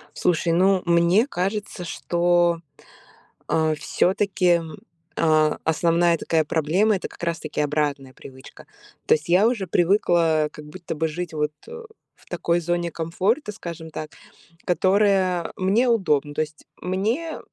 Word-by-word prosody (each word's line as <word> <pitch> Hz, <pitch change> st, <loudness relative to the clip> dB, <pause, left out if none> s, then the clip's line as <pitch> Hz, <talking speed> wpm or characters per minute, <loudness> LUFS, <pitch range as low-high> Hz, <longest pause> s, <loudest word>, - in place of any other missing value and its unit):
Слушай, 170 Hz, -1 st, +1 dB
ну, 185 Hz, +2 st, +3 dB
мне 170 Hz, +7 st, +3 dB
кажется, 195 Hz, -3 st, -3 dB
что, 175 Hz, 0 st, +1 dB, 0.9 s
а, 160 Hz, -1 st, +1 dB
всё-таки, 190 Hz, +4 st, 0 dB, 0.2 s
м, 160 Hz, -2 st, -9 dB, 0.4 s
а, 155 Hz, -2 st, +3 dB
основная 170 Hz, +1 st, +2 dB
такая 160 Hz, 0 st, 0 dB
проблема- 170 Hz, +8 st, +1 dB
это 185 Hz, -, -4 dB
как -, -, -15 dB
раз-таки 160 Hz, -3 st, -2 dB
обратная 145 Hz, -3 st, -2 dB
привычка. 130 Hz, 0 st, -14 dB, 0.4 s
То -, -, +4 dB
есть 155 Hz, +2 st, -2 dB
я 185 Hz, +5 st, +5 dB
уже 215 Hz, -6 st, -1 dB
привыкла 170 Hz, -4 st, +2 dB
как 150 Hz, -, -11 dB
будто 170 Hz, +1 st, -7 dB
бы 160 Hz, +1 st, 0 dB
жить, 165 Hz, +1 st, -5 dB
вот, 150 Hz, 0 st, -1 dB, 0.2 s
э, 470 Hz, 0 st, -9 dB, 0.3 s
в -, -, -25 dB
такой 170 Hz, 0 st, 0 dB
зоне 175 Hz, 0 st, -2 dB
комфорта, 195 Hz, -, -1 dB
скажем 170 Hz, -5 st, -8 dB
так, 155 Hz, 0 st, -7 dB, 0.5 s
которая 185 Hz, 0 st, +2 dB
мне 205 Hz, +7 st, +2 dB
удобна. 150 Hz, -, +1 dB
То -, -, -1 dB
есть 155 Hz, 0 st, -7 dB, 0.2 s
мне, 225 Hz, -, -2 dB
170 Hz, 135 wpm, -23 LUFS, 155-190 Hz, 0.9 s, я